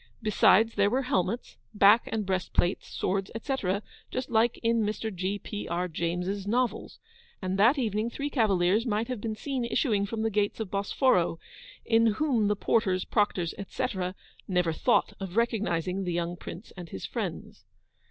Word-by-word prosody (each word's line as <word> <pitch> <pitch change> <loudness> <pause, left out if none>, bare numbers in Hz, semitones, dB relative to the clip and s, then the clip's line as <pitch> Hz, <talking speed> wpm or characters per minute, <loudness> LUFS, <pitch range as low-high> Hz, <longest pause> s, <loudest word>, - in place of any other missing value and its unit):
Besides, 220 +1 +4
there 200 0 +3
were 260 +5 0
helmets, 230 -3 -1 0.2
back 205 +3 +6
and 220 -2 -1
breast 185 -2 -2
plates, 175 +2 +1
swords, 195 +1 -2
etc., 215 -6 -1 0.3
just 255 -1 -4
like 230 +1 +3
in 230 0 +2
Mr. 215 +1 -2
G. 190 +3 -2
P. 210 0 -6
R. 175 +2 -1
James's 180 +4 -2
novels; 245 +2 -1 0.4
and 185 0 -2
that 235 +8 +5
evening 220 -3 0
three 285 +4 -4
cavaliers 205 -4 +3
might 220 +2 0
have 250 -5 -3
been 220 -1 -3
seen 265 +2 -3
issuing 220 -4 +1
from 220 +1 -3
the 225 - 0
gates 205 +1 0
of 220 -4 -4
Bosforo, 200 -3 +2 0.5
in 230 0 +4
whom 245 -5 +1
the 210 - +2
porters, 190 -3 +1
proctors, 195 -6 0
etc., 185 -1 -3 0.3
never 180 -3 +1
thought 220 +4 +2
of 195 0 -6
recognising 195 -5 0
the 180 -2 -2
young 170 0 -2
Prince 175 +4 -9
and 175 -3 -8
his 95 - -6
friends. - - -5
205 Hz, 165 wpm, -28 LUFS, 185-230 Hz, 0.5 s, back